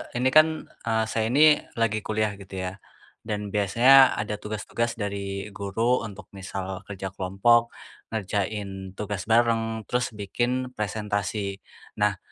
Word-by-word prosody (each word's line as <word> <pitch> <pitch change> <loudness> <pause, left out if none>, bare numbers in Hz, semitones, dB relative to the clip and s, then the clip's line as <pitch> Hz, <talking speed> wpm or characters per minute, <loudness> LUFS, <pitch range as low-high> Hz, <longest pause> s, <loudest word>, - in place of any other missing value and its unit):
ini 125 +2 +2
kan, 155 +1 +9 0.4
eee, 110 -1 +1
saya 110 -1 0
ini 150 +3 +6 0.2
lagi 110 -2 +1
kuliah, 110 -1 -1
gitu 95 -1 -11
ya. 90 - -6 0.5
Dan 105 -2 -4
biasanya 120 +7 +6
ada 105 0 -2
tugas-tugas 115 +3 -3
dari 100 -2 -3
guru 110 +6 0
untuk 105 -3 -8
misal 95 -1 -5
kerja 95 -1 -5
kelompok, 115 +6 +3 0.4
ngerjain 100 -2 -3
tugas 105 +1 -4
bareng, 115 -1 +2
terus 125 +3 0
bikin 120 +5 -2
presentasi. 105 -2 -3 0.4
Nah, 105 -2 +3
105 Hz, 125 wpm, -26 LUFS, 100-115 Hz, 0.5 s, kan